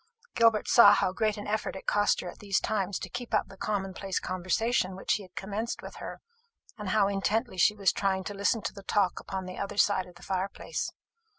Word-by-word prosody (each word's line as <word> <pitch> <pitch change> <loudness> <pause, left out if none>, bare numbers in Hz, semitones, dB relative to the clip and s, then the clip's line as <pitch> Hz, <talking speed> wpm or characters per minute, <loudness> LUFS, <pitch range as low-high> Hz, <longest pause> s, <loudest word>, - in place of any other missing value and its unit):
Gilbert 230 -3 +4
saw 205 -4 +8
how 185 - +1
great 215 0 0
an 205 - -6
effort 215 -1 -2
it 190 - -8
cost 205 0 +2
her - - -7
at - - -17
these 200 -3 +1
times 200 -3 -1
to - - -6
keep 245 -2 -3
up 210 - +1
the 195 - -12
commonplace 195 -1 -2
conversation 185 +2 0
which 190 - 0
he - - -1
had 185 -2 -14
commenced 210 +4 -4
with - - -9
her, - - -7 0.5
and 210 -3 -5
how 200 0 +3
intently 205 +3 0
she 185 +3 +4
was 200 -3 +3
trying 190 -1 0
to 205 - -5
listen 200 +2 +1
to - - -3
the 200 - -10
talk 195 -2 +1
upon 190 -1 -5
the 185 0 -7
other 200 0 -4
side 195 -3 +3
of 180 - -15
the 175 - -15
fire 190 +1 -1
place. - - -4
200 Hz, 225 wpm, -29 LUFS, 190-210 Hz, 0.5 s, saw